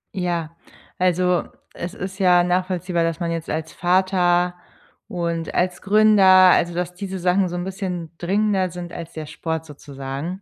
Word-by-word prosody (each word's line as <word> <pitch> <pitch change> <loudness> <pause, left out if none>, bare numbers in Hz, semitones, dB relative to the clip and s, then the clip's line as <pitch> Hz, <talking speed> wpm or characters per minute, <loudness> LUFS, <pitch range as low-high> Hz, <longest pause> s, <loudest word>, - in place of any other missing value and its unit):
Ja, 170 -3 -2 0.4
also, 180 0 +2 0.3
es 170 +1 -6
ist 190 +1 -6
ja 180 -2 +5
nachvollziehbar, 180 -1 0
dass 165 -1 -1
man 170 -1 -2
jetzt 165 -1 -4
als 160 0 -4
Vater 180 -1 +2 0.5
und 170 -2 -3
als 180 0 0
Gründer 215 0 +4 0.3
also, 170 0 +2
dass 180 0 -3
diese 190 +1 -6
Sachen 180 +1 +1
so 175 - -5
'n 175 - -3
bisschen 180 -4 -5
dringender 195 +1 +1
sind 175 0 -8
als 165 -1 -8
der 155 -1 -6
Sport 160 +1 -4
sozusagen. 145 +4 -7
175 Hz, 155 wpm, -22 LUFS, 165-185 Hz, 0.5 s, ja